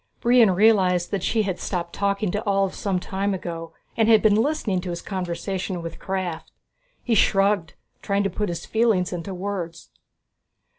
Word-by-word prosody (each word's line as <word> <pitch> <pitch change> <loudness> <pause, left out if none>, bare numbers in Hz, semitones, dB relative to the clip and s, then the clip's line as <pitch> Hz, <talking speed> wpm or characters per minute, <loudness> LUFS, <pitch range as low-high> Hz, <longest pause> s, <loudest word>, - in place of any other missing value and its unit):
Brion 240 -2 +5
realized 185 -3 +3
that 200 - -1
she 220 +4 +1
had 190 -3 -3
stopped 170 -2 -3
talking 200 -1 0
to 210 - -2
Ulv 195 -1 +1
some 195 -3 -1
time 195 +2 -2
ago, 165 -2 -6 0.2
and 225 -1 +2
had 220 -2 +6
been 215 -2 +5
listening 220 -5 +1
to 180 - -6
his 170 0 -3
conversation 185 0 -4
with 165 - -7
Krafft. 185 -4 -4 0.5
He 240 - 0
shrugged, 195 -4 +2 0.3
trying 200 0 0
to 195 - 0
put 210 +2 -2
his 170 - -5
feeling 220 -5 +2
into 180 +2 -5
words. 180 -3 -5
195 Hz, 165 wpm, -24 LUFS, 180-210 Hz, 0.5 s, had